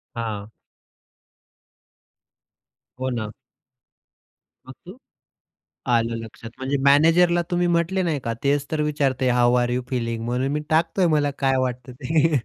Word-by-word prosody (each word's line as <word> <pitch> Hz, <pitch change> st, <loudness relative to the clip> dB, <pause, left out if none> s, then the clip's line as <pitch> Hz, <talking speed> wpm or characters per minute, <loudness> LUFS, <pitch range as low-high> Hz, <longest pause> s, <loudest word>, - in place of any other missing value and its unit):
हां. 110 Hz, -3 st, -4 dB, 2.5 s
हो 130 Hz, 0 st, -1 dB
ना. 110 Hz, -4 st, -4 dB, 1.3 s
मग 130 Hz, -, -9 dB
तू 185 Hz, +6 st, -11 dB, 1.0 s
आलं 115 Hz, 0 st, +1 dB
लक्षात. 115 Hz, 0 st, -9 dB
म्हणजे 135 Hz, +2 st, -1 dB
मॅनेजरला 165 Hz, +5 st, +5 dB
तुम्ही 175 Hz, 0 st, +1 dB
म्हटले 175 Hz, +2 st, +1 dB
नाही 160 Hz, -5 st, -1 dB
का, 115 Hz, -, -1 dB
तेच 140 Hz, 0 st, +1 dB
तर 155 Hz, -1 st, -1 dB
विचारतंय 140 Hz, -4 st, 0 dB
हाउ 120 Hz, 0 st, +3 dB
आर 120 Hz, -, -1 dB
यू 125 Hz, +1 st, -1 dB
फीलिंग? 115 Hz, -3 st, -2 dB
म्हणून 125 Hz, +3 st, -1 dB
मी 150 Hz, -, -1 dB
टाकतोय, 165 Hz, +3 st, +2 dB
मला 145 Hz, -1 st, +1 dB
काय 135 Hz, -1 st, +2 dB
वाटतं 125 Hz, 0 st, -7 dB
ते. 150 Hz, +4 st, +1 dB
135 Hz, 130 wpm, -23 LUFS, 120-160 Hz, 2.5 s, मॅनेजरला